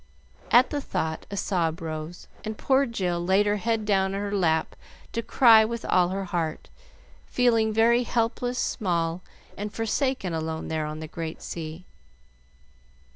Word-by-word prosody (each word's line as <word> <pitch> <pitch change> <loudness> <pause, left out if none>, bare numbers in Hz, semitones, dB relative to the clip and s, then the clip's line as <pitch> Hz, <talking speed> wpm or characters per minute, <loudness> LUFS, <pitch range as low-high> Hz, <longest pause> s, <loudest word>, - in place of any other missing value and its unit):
At 245 +2 +5
the 290 - -1
thought 160 - -3
a 200 - -5
sob 170 -4 0
rose, 160 +1 -6 0.2
and 215 0 -5
poor 270 0 +2
Jill 180 -7 -2
laid 190 +3 +3
her 205 0 +1
head 225 +1 -1
down 195 -2 +1
on - - -2
her 205 0 -2
lap 160 -4 +1 0.4
to 230 - -2
cry 230 -1 +6
with 230 +1 -4
all 180 -1 +3
her 195 +1 -2
heart, 165 -3 -3 0.6
feeling 230 -3 +2
very 230 +2 +4
helpless, 245 +1 -1
small, 170 -7 -1 0.3
and 205 +1 -5
forsaken 225 - -1
alone 160 0 -3
there 155 -1 -1
on 155 +1 -6
the 160 - -6
great 160 0 -6
sea. 160 +1 -6
195 Hz, 155 wpm, -26 LUFS, 165-225 Hz, 0.6 s, cry